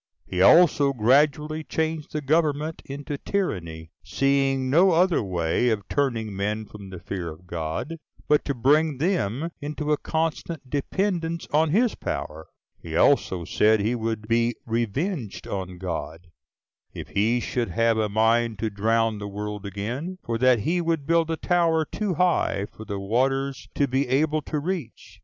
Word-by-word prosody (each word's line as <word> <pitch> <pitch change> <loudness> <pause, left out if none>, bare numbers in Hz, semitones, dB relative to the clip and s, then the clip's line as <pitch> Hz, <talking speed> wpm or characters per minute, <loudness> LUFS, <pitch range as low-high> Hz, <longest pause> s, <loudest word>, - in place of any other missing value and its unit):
He 90 - -2
also 145 - +6
gradually 150 +6 +2
changed 160 -1 -2
the 150 - -2
government 155 +1 0
into 140 +1 -6
tyranny, 85 - -3
seeing 135 -1 +1
no 170 +7 +5
other 175 +1 +3
way 90 +3 0
of 105 -3 -2
turning 115 -7 -1
men 105 +2 -2
from 100 -2 -11
the 95 - -8
fear 90 -1 -5
of 80 +3 -12
God, 85 - -4 0.3
but 150 0 +3
to 140 - -1
bring 145 +4 +3
them 160 - -1
into 150 +1 -3
a 150 - +3
constant 160 -2 -2
dependence 165 +4 -1
on 155 +1 +3
his 225 +8 +3
power. 80 +1 -5 0.3
He - - -7
also 90 -3 +3
said 110 +5 +3
he 110 +4 0
would 110 -2 -3
be 115 +1 +2
revenged 120 - -2
on 95 -2 -5
God, 85 -1 -6 0.6
if - - -7
he 115 +5 +1
should 120 -2 -2
have 115 +4 +2
a 105 -1 +1
mind 115 +1 +2
to 110 +1 -2
drown 110 +1 +1
the 105 - -5
world 105 0 -5
again; 120 - -4
for 115 -1 -2
that 125 -2 +4
he 175 - 0
would 165 -4 -1
build 165 +1 +2
a 165 - -1
tower 165 -3 +2
too 200 +2 -3
high 175 - +1
for 110 - -9
the 100 -1 -4
waters 135 +6 -1
to 140 - +2
be 135 +1 0
able 150 +4 +1
to 150 - -4
reach! 155 -5 -5
130 Hz, 160 wpm, -25 LUFS, 105-155 Hz, 0.6 s, also